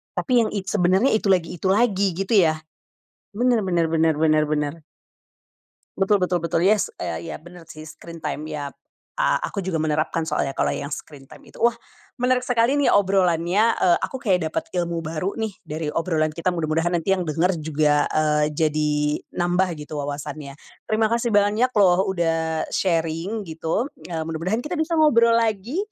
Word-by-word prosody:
Tapi 245 -3 +2
yang, - - -3
i 205 - -1
sebenarnya 190 +4 +2
itu 210 - -2
lagi 180 -2 0
itu 185 - -2
lagi 200 -3 +2
gitu 195 +6 0
ya, 160 -5 +3 0.7
benar 240 +1 +1
benar 175 -3 +1
benar 160 0 +2
benar 155 -1 +3
benar. 150 -1 -1 1.2
Betul 195 0 +2
betul 180 -1 0
betul, 165 +1 0
yes, 205 +1 +3
e 165 - -5
iya - - -5
benar 175 +1 -14
sih, 155 -1 -10
screen 165 +2 -11
time 150 +1 -4
iya 145 -2 -5
p - - -41 0.4
a - - +3
aku 200 - -3
juga 185 -2 -3
menerapkan 155 +1 -1
soalnya 135 -3 -2
kalau - - +1
yang 140 - -4
screen 145 -2 -8
time - - -15
itu. - - -16
Wah, 235 0 +3 0.4
menarik 250 +1 +2
sekali 250 +2 +1
nih 280 - +3
obrolannya, 190 +2 +2
e - - +1
aku - - -3
kayak 185 -10 0
dapet - - -3
ilmu 170 -2 -2
baru 165 +5 -3
nih 220 -2 -3 0.2
dari 155 0 -3
obrolan 160 -2 0
kita 170 +3 -2
mudah-mudahan 165 0 0
nanti 170 +3 0
yang 180 -3 -1
denger 165 +5 +1
juga, 150 -1 +1
eee, 150 -1 +1
jadi 155 -1 +1 0.5
nambah 180 +2 +1 0.2
gitu 150 0 -5
wawasannya. 145 0 -6 0.3
Terima 220 0 +1
kasih 235 +1 +1
banyak 210 +3 +3
loh, 190 -2 +4
udah 165 -3 0
sharing 170 +4 -1
gitu, 165 +5 -2 0.2
eee, 165 -2 -3
mudah-mudahan 165 +9 -2
kita 325 +1 -3
bisa 330 +1 0
ngobrol 235 -7 +5
lagi, 225 - -1
175 Hz, 175 wpm, -23 LUFS, 155-210 Hz, 1.2 s, ngobrol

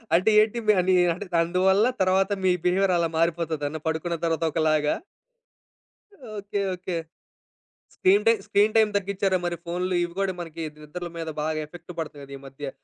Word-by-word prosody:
అంటే 185 +6 +3
ఏంటి 215 +2 +2
మీ 215 - +7
అంటే 180 +1 +2 0.2
అందువల్ల 185 +5 +3 0.2
తర్వాత 190 +1 +2
మీ 185 - +4
బిహేవియర్ 185 +1 +3
అలా 170 -1 +2
మారిపోతదన్నా? 160 -2 -1
పడుకున్న 160 +2 -1
తర్వాత 165 0 0
ఒకలాగా? 155 -1 +2 1.4
Okay. 205 0 -4 0.2
Okay. 180 -1 -4 1.0
Screen 200 +3 +4
time, 225 -3 +4
screen 210 +2 +3
time 220 -1 +5
తగ్గించారా 195 -1 0
మరి? 175 0 -1
ఫోన్లు 180 +2 -2
ఇవి 175 0 -5
కూడా 195 -1 0
మనకి 165 -1 -6 0.2
నిద్రల 175 +4 -7
మీద 165 -1 -4
బాగా 155 0 -1
ఎఫెక్ట్ 175 +2 -11
పడతాయి 150 -3 -5
కదా 140 0 -11
ఈ - - -14
మధ్య. 135 +1 -7
175 Hz, 155 wpm, -25 LUFS, 160-190 Hz, 1.4 s, మీ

